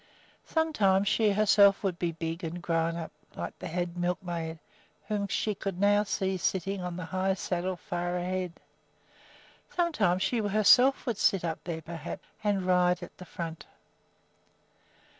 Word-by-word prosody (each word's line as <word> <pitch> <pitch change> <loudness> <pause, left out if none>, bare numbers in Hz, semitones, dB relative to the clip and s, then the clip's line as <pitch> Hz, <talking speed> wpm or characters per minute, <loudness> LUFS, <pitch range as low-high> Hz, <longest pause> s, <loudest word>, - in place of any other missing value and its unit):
Sometime 215 - +2
she 210 +1 +3
herself 200 0 +5
would 185 -3 -1
be 170 -1 0
big 165 +1 -4
and 170 +2 -4
grown 165 -1 0
up, 165 -1 -5 0.2
like - - -6
the - - -5
head 175 +1 -3
milkmaid, 175 -2 -2 0.5
whom 205 -2 -1
she 210 +2 0
could 195 -2 -5
now 205 +1 +4
see 190 -2 -1
sitting 190 +2 -1
on 180 -1 -4
the 180 - -4
high 190 +2 0
saddle 185 0 -2
far 175 +1 -3
ahead. 180 0 -2 1.2
Sometime 315 - +1
she 195 +6 0
herself 215 +6 +5
would 235 -5 -2
sit 190 -3 +3
up 160 -1 -3
there, 165 -2 -4
perhaps, 165 0 -7 0.2
and 200 -3 +1
ride 180 -1 +3
at - - -10
the 180 - -9
front. 165 -1 -6
185 Hz, 150 wpm, -29 LUFS, 175-200 Hz, 1.2 s, herself